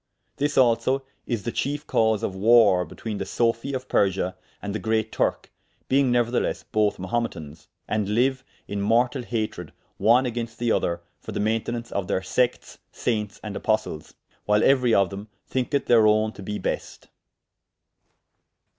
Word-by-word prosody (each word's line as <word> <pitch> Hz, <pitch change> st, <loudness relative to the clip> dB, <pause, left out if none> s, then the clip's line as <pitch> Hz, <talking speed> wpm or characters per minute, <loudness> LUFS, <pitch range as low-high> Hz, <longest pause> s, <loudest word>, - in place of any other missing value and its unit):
This 145 Hz, +1 st, -1 dB
also 130 Hz, +2 st, +3 dB, 0.2 s
is 115 Hz, -5 st, -2 dB
the 120 Hz, -, -2 dB
chiefe 145 Hz, +4 st, -2 dB
cause 110 Hz, -2 st, +1 dB
of -, -, -1 dB
warre 100 Hz, -2 st, +5 dB
between 110 Hz, -3 st, -6 dB
the -, -, -2 dB
sophie 115 Hz, +3 st, 0 dB
of 130 Hz, -1 st, -4 dB
Persia 95 Hz, -1 st, +1 dB, 0.2 s
and 100 Hz, -1 st, -5 dB
the 110 Hz, -, -2 dB
great 110 Hz, 0 st, 0 dB
Turke, -, -, -1 dB, 0.4 s
being 135 Hz, -1 st, +3 dB
neuerthelesse 120 Hz, 0 st, 0 dB
both 105 Hz, -2 st, +2 dB
Mahumetans, 90 Hz, -7 st, -4 dB, 0.2 s
and 105 Hz, -2 st, -1 dB
lyue 130 Hz, +5 st, +1 dB, 0.3 s
in 100 Hz, 0 st, -3 dB
mortall 120 Hz, +5 st, +2 dB
hatred 110 Hz, -8 st, -4 dB, 0.2 s
one 120 Hz, +6 st, +4 dB
agaynst 115 Hz, -2 st, -4 dB
the 120 Hz, -1 st, 0 dB
other 85 Hz, -5 st, 0 dB, 0.2 s
for -, -, -8 dB
the -, -, -3 dB
mayntenaunce 115 Hz, +2 st, -1 dB
of 100 Hz, -2 st, -2 dB
theyr 95 Hz, -1 st, 0 dB
sectes, 125 Hz, -1 st, -1 dB
saintes 105 Hz, -4 st, -2 dB
and 105 Hz, -2 st, -6 dB
apostles, 110 Hz, -9 st, -2 dB, 0.3 s
whyle 105 Hz, 0 st, +4 dB
euery 125 Hz, -4 st, +4 dB
of 100 Hz, -3 st, +3 dB
them 100 Hz, +2 st, -7 dB, 0.2 s
thynketh 130 Hz, +2 st, -1 dB
theyr 115 Hz, -3 st, +5 dB
owne 110 Hz, 0 st, +3 dB
to 105 Hz, -, -12 dB
bee 105 Hz, +2 st, -4 dB
best. -, -, -4 dB
110 Hz, 155 wpm, -25 LUFS, 100-120 Hz, 0.4 s, warre